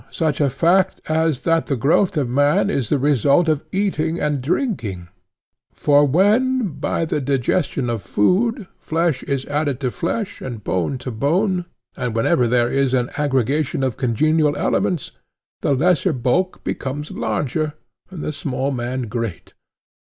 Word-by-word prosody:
such 155 -3 -1
a 140 - +3
fact 175 +8 +2
as 160 -3 +1
that 165 -1 +1
the 140 - 0
growth 160 - +2
of 140 -4 +1
man 145 +10 +2
is 130 - -1
the 145 - +2
result 140 +4 +3
of 155 -2 +1
eating 170 -4 0
and 150 -2 0
drinking; 125 - -2 0.6
for 145 0 +3
when 215 - +2
by 165 - -1
the 150 - -1
digestion 135 0 0
of 115 -3 -2
food 215 - +1
flesh 160 -4 0
is 140 -2 -2
added 145 -3 -1
to 130 -3 -1
flesh 200 - -3
and 120 -5 -6
bone 95 +9 -1
to 125 0 -6
bone, 180 - 0 0.3
and 125 -4 -3
whenever 125 +2 +2
there 120 0 +2
is 135 -1 +1
an 125 -1 0
aggregation 140 0 0
of 130 -3 0
congenial 150 +5 +1
elements, 175 -7 0 0.5
the 140 - +2
lesser 160 +3 +2
bulk 130 +10 0
becomes 145 +3 -4
larger 150 +2 -2 0.4
and 180 -5 -7
the 155 - -3
small 135 -1 -2
man 125 0 -3
great. 115 -5 -5
145 Hz, 150 wpm, -20 LUFS, 130-165 Hz, 0.6 s, a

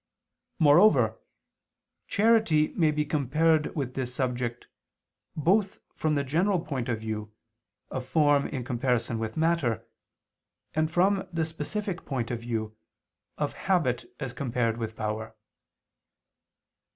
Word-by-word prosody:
Moreover 170 +7 +5 0.9
charity 215 -8 +3
may 160 -3 +2
be 150 0 0
compared 155 +1 +1
with 135 -5 -2
this 130 -2 -3
subject, 125 -2 -2 0.7
both 190 +6 +2 0.2
from 155 -1 0
the 140 - +1
general 175 +8 +1
point 135 -7 -4
of 115 -2 -1
view 105 -1 -4 0.6
of 130 - -3
form 145 0 +3
in 130 -3 -4
comparison 120 -1 0
with 110 +3 -4
matter, 150 -9 +1 0.9
and 155 0 +1
from 190 +4 +2
the 165 -2 0
specific 170 +4 -4
point 125 -5 -3
of 120 - -2
view 110 -2 -3 0.6
of - - -1
habit 125 -11 0
as 135 -4 -4
compared 120 -4 -1
with 110 -1 -4
power. 110 0 -4
140 Hz, 120 wpm, -28 LUFS, 120-165 Hz, 0.9 s, Moreover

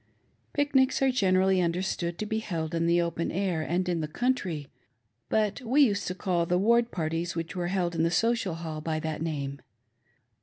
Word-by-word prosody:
Pic 290 -1 0
nics 265 -1 +4
are 265 - +4
generally 190 -4 +3
understood 175 0 -1
to 215 - -3
be 220 +1 -1
held 165 -6 -4
in 165 0 +1
the 170 +1 +4
open 170 -1 -1
air, 185 -3 -1
and 175 +4 -1
in 175 -2 0
the 155 - -2
country; 180 - -1 0.6
but 215 +2 +1
we 255 +5 +3
used 205 -6 +1
to 180 - -3
call 175 -3 0
the 180 - +2
ward 235 +4 +3
parties 165 -1 -2
which 165 -2 -4
were 175 -1 -1
held 175 -2 0
in 165 - 0
the 165 - +3
Social 225 0 +1
Hall 160 -2 -5
by 155 0 -2
that 155 -1 -4
name. 140 -4 -3
175 Hz, 195 wpm, -28 LUFS, 165-210 Hz, 0.6 s, nics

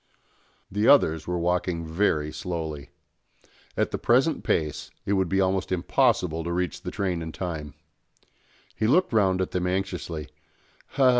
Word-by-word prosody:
The 105 +3 +1
others 80 - +5
were 90 0 -1
walking 90 -1 0
very 80 -3 +1
slowly. 80 -2 -5 0.9
At - - +1
the - - -3
present 130 +7 +2
pace 75 -3 -1 0.2
it 100 - +1
would 95 -3 +1
be 95 - +1
almost 95 0 +1
impossible 85 -2 +1
to 85 - -3
reach 90 -1 -2
the - - -4
train 90 -4 -2
in 80 0 -5
time. 80 -5 -5 1.0
He 110 - 0
looked 175 +3 +3
round 95 -4 +3
at 95 - -2
them 90 0 -1
anxiously. 90 -4 -3
90 Hz, 145 wpm, -26 LUFS, 80-95 Hz, 1.0 s, others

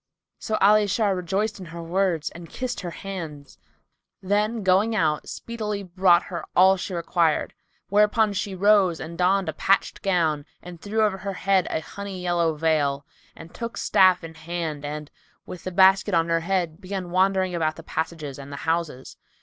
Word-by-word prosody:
So 220 - -2
Ali 210 +1 +5
Shar 200 -1 +1
rejoiced 195 +4 -2
in 185 - -9
her 170 0 -8
words 175 -2 0
and 170 0 -11
kissed 255 -1 -4
her 180 - -5
hands, 155 - -8 0.6
then, 210 +3 0
going 195 +4 +3
out, 155 -7 0
speedily 210 -3 -4
brought 180 -1 +3
her 175 - -6
all 190 +1 +6
she 185 0 -5
required; 170 -2 0 0.4
whereupon 210 +1 +3
she 195 0 -3
rose 195 -3 +3
and 165 +1 -7
donned 185 +2 +2
a - - -2
patched 195 - +1
gown 165 -6 +1 0.2
and 175 -2 -10
threw 220 +2 0
over 200 -3 0
her 195 +1 -4
head 190 -1 +1
a 160 - -2
honey 200 +2 -7
yellow 175 -3 0
veil, 150 -3 0 0.3
and 165 - -12
took 230 0 -6
staff 185 -2 +4
in 165 0 -8
hand 160 -2 -5
and, 150 +1 -6 0.3
with 180 - -9
the 185 - -3
basket 190 +1 +4
on 165 0 +2
her 165 0 +2
head, 175 -1 -2
began 185 -2 -5
wandering 190 0 +2
about 160 -2 0
the 165 - -11
passages 155 -4 -4
and 140 +1 -9
the - - -5
houses. 160 -5 -2
180 Hz, 175 wpm, -24 LUFS, 165-195 Hz, 0.6 s, all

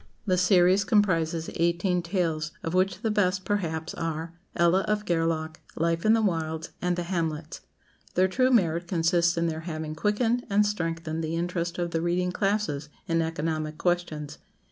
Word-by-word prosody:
The 185 -3 +2
series 180 +1 +4
comprises 170 -7 +1
eighteen 170 +2 +1
tales, 165 -4 -1
of 165 - -3
which 185 +3 +1
the 220 - +1
best, 190 -2 +1
perhaps, 170 -5 -2
are 165 0 -4 0.2
"Ella 170 +2 +4
of 210 0 0
Gareloch," 165 -2 -1 0.2
"Life 165 +3 0
in 220 - +6
the 225 -1 +3
Wilds," 160 -4 -1
and 180 0 +1
"The 175 - -2
Hamlets." 165 -3 -3 0.5
Their 185 +1 +4
true 255 +7 +2
merit 175 -8 +2
consists 170 -1 +2
in 170 - +1
their 160 -1 -2
having 155 -1 -4
quickened 225 +7 +1
and 205 +1 +4
strengthened 165 -5 -2
the 160 +1 -2
interest 175 0 -2
of 175 -1 -2
the 165 - 0
reading 180 +1 0
classes 195 -7 -1 0.2
in 165 -1 +2
economic 160 -1 -2
questions. 175 -5 -2
170 Hz, 165 wpm, -27 LUFS, 165-190 Hz, 0.5 s, in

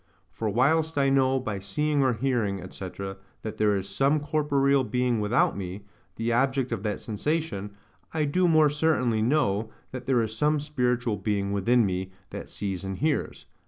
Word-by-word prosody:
For 110 - -2
whilst 155 +8 +2
I 135 -1 +3
know, 135 -1 +3
by 110 -6 -4
seeing 145 +10 0
or 130 -2 +3
hearing, 115 -5 0
&c., 95 - -6 0.5
that 110 - -5
there 105 -1 +3
is 95 0 -3
some 135 +10 +2
corporeal 140 -2 +2
being 125 -2 0
without 105 +3 +2
me, 95 +1 -6 0.3
the 115 +1 -1
object 130 +1 +1
of - - -2
that 105 -1 -2
sensation, 110 -4 -3 0.4
I 155 -2 0
do 180 +5 +2
more 155 -3 +5
certainly 145 -7 +1
know, 115 -4 +1 0.2
that 130 -1 -7
there 125 -3 +3
is 110 0 -4
some 150 +5 +2
spiritual 125 -6 0
being 100 -2 -1
within 115 +4 +3
me 95 0 -2 0.2
that - - -7
sees 95 -2 -4
and 95 -1 -4
hears. 150 0 -1
125 Hz, 170 wpm, -27 LUFS, 105-145 Hz, 0.5 s, more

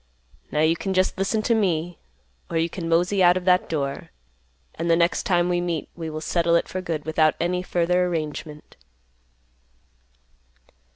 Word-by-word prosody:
Now 150 - +1
you 160 +1 +3
can 190 +3 -3
just 185 0 +2
listen 195 +3 -1
to 235 - +2
me, 175 -5 0 0.5
or 165 - -2
you 165 +1 +1
can 165 -3 -5
mosey 180 +4 +2
out 180 0 +6
of 180 - -5
that 180 -1 +3
door, 140 -3 -3 0.6
and 170 - -3
the 165 - +5
next 170 +1 +1
time 175 -2 +2
we 175 0 0
meet, 170 -4 -3
we 165 -2 -5
will 155 0 -6
settle 170 +1 +1
it 170 - +1
for 185 - -4
good, 165 -4 -4
without 155 -1 +2
any 180 +1 0
further 180 0 +1
arrangement." 155 -2 -5
170 Hz, 170 wpm, -24 LUFS, 160-180 Hz, 0.6 s, out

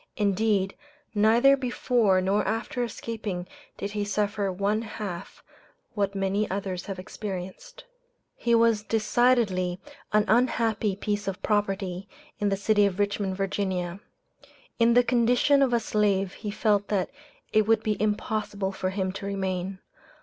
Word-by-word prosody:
Indeed, 200 -2 +1 0.4
neither 230 +6 +5
before 245 -6 +2
nor 195 +3 +1
after 225 +2 -1
escaping 215 -6 -5 0.3
did 200 - -4
he 210 -1 -2
suffer 205 -1 -1
one 200 +4 0
half 205 -5 -7 0.5
what 200 -2 -1
many 195 +2 0
others 190 -2 -3
have 195 -2 -4
experienced. 190 - -7 0.5
He 235 0 +2
was 230 -2 +4
decidedly 215 -5 +2 0.3
an 210 0 +3
unhappy 225 -3 +2
piece 205 0 -3
of 195 -2 -4
property 195 -3 -1 0.3
in 205 - +1
the 195 - 0
city 205 0 +3
of 185 -2 -4
Richmond, 200 -2 -1
Va. 190 -2 -2 0.8
In 230 0 +4
the 245 - +6
condition 245 +4 +3
of 265 -2 +3
a 235 - +3
slave 200 -3 +1
he 210 - -6
felt 205 -1 +1
that 195 -3 -1 0.4
it 215 -1 +4
would 225 0 +3
be 210 -1 -1
impossible 210 -2 -1
for 190 -1 -2
him 190 -1 -2
to 200 +1 -6
remain. 190 -1 -2
205 Hz, 140 wpm, -26 LUFS, 195-220 Hz, 0.8 s, the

